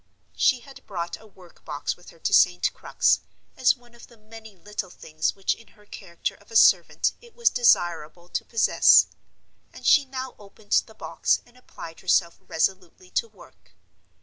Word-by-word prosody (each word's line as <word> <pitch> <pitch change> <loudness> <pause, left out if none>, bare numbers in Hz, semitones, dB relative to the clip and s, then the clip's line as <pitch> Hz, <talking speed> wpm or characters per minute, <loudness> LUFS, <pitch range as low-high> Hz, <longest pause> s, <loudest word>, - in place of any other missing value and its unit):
She 255 -3 +2
had 270 +3 -15
brought 175 -3 -5
a 220 - -16
work 185 -4 -20
box 145 -1 -4
with 175 - -17
her - - -18
to - - -2
St. 180 0 +4
Crux, - - +1 0.4
as 260 - +3
one 240 -2 -23
of 235 - -15
the 235 - -20
many 220 -1 -14
little 205 0 -6
things 155 -2 -3
which 195 -1 0
in 230 - -17
her 210 - -21
character 175 -4 -6
of 205 - -22
a 225 - -11
servant - - +4
it 475 -2 -18
was 470 -1 +3
desirable 175 -7 +1
to - - -3
possess; 230 - +5 0.7
and - - -13
she 290 -2 +5
now 260 -1 -6
opened 205 0 -18 0.2
the 220 - -17
box - - -1
and 240 - -24
applied 165 -9 -12
herself 175 -2 +1
resolutely 190 - -3
to 485 -2 -1
work. - - -20
210 Hz, 175 wpm, -25 LUFS, 175-240 Hz, 0.7 s, possess